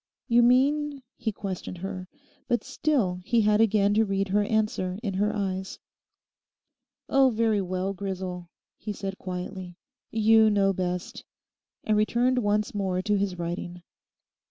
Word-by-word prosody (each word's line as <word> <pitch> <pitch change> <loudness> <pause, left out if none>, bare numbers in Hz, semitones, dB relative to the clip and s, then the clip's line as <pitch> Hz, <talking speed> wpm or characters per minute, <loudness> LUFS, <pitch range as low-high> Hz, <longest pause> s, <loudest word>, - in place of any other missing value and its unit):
'You 240 -1 +5
mean?' 275 +3 +2
he 225 -3 -2
questioned 190 -2 -6
her; 185 0 -6 0.4
but 240 - 0
still 265 -10 0
he 235 +3 +2
had 210 0 +3
again 205 -2 +3
to 220 +2 +4
read 195 -1 -1
her 205 +2 +3
answer 205 -4 -1
in 200 -4 -2
her 205 +3 +1
eyes. 190 -2 -3 1.3
'Oh, 270 -1 +4
very 220 -3 +1
well, 185 +1 -2
Grisel,' 185 -2 -5 0.3
he 210 - -4
said 195 -1 -6
quietly, 180 -1 -6 0.3
'you 220 0 +5
know 200 -2 +3
best,' 180 -1 -4 0.6
and 215 - +1
returned 240 +4 +2
once 210 -1 0
more 190 -3 -1
to 210 0 +1
his 195 -2 -1
writing. 175 +1 -5
200 Hz, 140 wpm, -26 LUFS, 185-225 Hz, 1.3 s, You